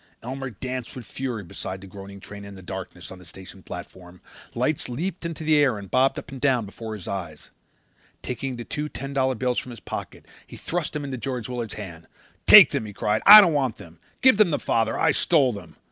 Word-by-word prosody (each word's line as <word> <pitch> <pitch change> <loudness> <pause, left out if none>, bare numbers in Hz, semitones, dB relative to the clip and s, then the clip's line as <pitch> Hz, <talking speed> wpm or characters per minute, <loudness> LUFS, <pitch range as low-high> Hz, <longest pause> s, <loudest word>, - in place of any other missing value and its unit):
Elmer 135 +2 -5
Cowley 110 - -17
danced 130 -2 -5
with 125 -3 -8
fury 125 -6 -5
beside 95 +2 -7
the 95 - -12
groaning 100 +1 -11
train 100 +1 -11
in 100 0 -10
the 95 - -12
darkness 95 -1 -8
on 95 - -10
the - - -14
station 95 +2 -13
platform. 90 0 -10 0.4
Lights 130 +3 -1
leaped 170 +7 -4
into 165 -1 -7
the 155 -1 +3
air 135 -7 +3
and 100 -2 -10
bobbed 130 +1 +2
up - - -8
and 135 -2 -9
down 130 -6 +2
before 110 +2 -8
his 100 - -10
eyes. 85 -6 -6 0.7
Taking 130 +1 -4
the 120 - -7
two 150 +1 -4
ten 135 +3 -7
dollar 130 -1 +1
bills 125 +1 -1
from - - -9
his 120 -2 -9
pocket - - -7 0.2
he - - -11
thrust 175 -1 -3
them 150 -1 -4
into 135 -2 -5
George 125 -1 -4
Willard's 120 -4 -5
hand. 85 -6 -9 0.4
"Take - - +10
them," 110 - -2
he 105 - -9
cried. 105 +2 -1
"I 210 +1 +13
don't 175 -5 +2
want 135 -6 0
them. 85 -5 -14 0.2
Give 260 -5 +6
them 210 -4 +5
to 150 - 0
father. 115 -1 0
I 160 - +4
stole 140 -8 +2
them." 100 - -11
120 Hz, 225 wpm, -24 LUFS, 100-135 Hz, 0.7 s, I